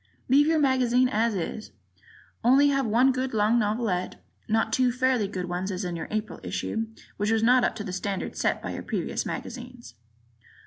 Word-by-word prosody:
Leave 285 +3 +5
your 320 0 +3
magazine 255 -3 +3
as 225 -1 0
is, 195 +4 -4 0.7
only 270 +4 +5
have 275 -3 +1
one 245 +5 +4
good 255 -1 -2
long 215 +3 +3
novelette, 210 -4 -1 0.3
not 220 0 +1
two 255 0 +3
fairly 250 -3 +1
good 185 -2 -4
ones 180 +2 -3
as 185 0 -3
in 175 -1 -3
your 165 - -5
April 215 0 -3
issue, 225 0 -3 0.3
which 205 +1 0
was 225 0 +2
not 250 +2 +5
up - - +1
to 215 - -5
the 190 -3 -6
standard 195 +1 -3
set - - -1
by - - -4
your - - -5
previous - - -3
magazines. 245 - -7
225 Hz, 185 wpm, -26 LUFS, 205-255 Hz, 0.7 s, Leave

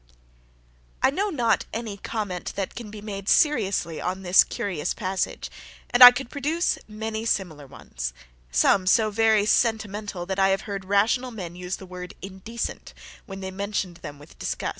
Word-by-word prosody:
I - - +5
know 395 +8 -1
not 235 - +1
any 220 -3 -5
comment 200 -4 -4
that 195 -2 -3
can 230 -3 -8
be 210 0 -9
made 200 -1 -5
seriously 200 - +2
on 185 +2 -3
this 180 0 +6
curious 180 -7 -3
passage, 190 -2 -3 0.4
and 245 +1 +8
I 245 - +15
could 245 0 -5
produce 310 +5 0
many 220 +1 -4
similar 170 -10 -2
ones; 60 - -6 0.4
and - - -13
some, 185 - +4
so 215 +3 +4
very 220 -1 +3
sentimental, 210 -5 0
that 190 +1 -3
I 195 0 +4
have 195 0 +1
heard 200 -2 -6
rational 215 +6 +2
men 180 -7 -7
use 180 +1 -4
the 190 - -11
word 180 0 -9
indecent, 195 +5 -6 0.3
when 195 -2 -8
they 190 0 -5
mentioned 195 -2 -3
them 145 - -9
with 145 +2 -17
disgust. - - -3
200 Hz, 170 wpm, -25 LUFS, 185-225 Hz, 0.4 s, I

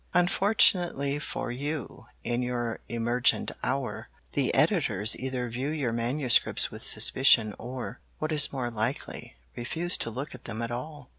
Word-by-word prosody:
Unfortunately 175 -6 +3
for 135 - -4
you 140 -2 -5 0.2
in 120 +1 -1
your 120 -2 -3
emergent 120 +3 +1
hour, 130 0 -2 0.2
the - - +1
editors 105 +3 +3
either 130 -1 -3
view 125 +4 -4
your 145 -7 -2
manuscripts 120 +2 +2
with - - -9
suspicion 115 -5 +4
or, 125 +1 -6 0.2
what 155 +1 -3
is 150 -2 +4
more 125 -3 -3
likely, 115 +4 -4 0.2
refuse 165 +9 0
to - - -2
look 130 +6 -6
at - - -12
them 115 0 -5
at 115 - -4
all. 135 +3 -7
125 Hz, 145 wpm, -28 LUFS, 120-145 Hz, 0.2 s, suspicion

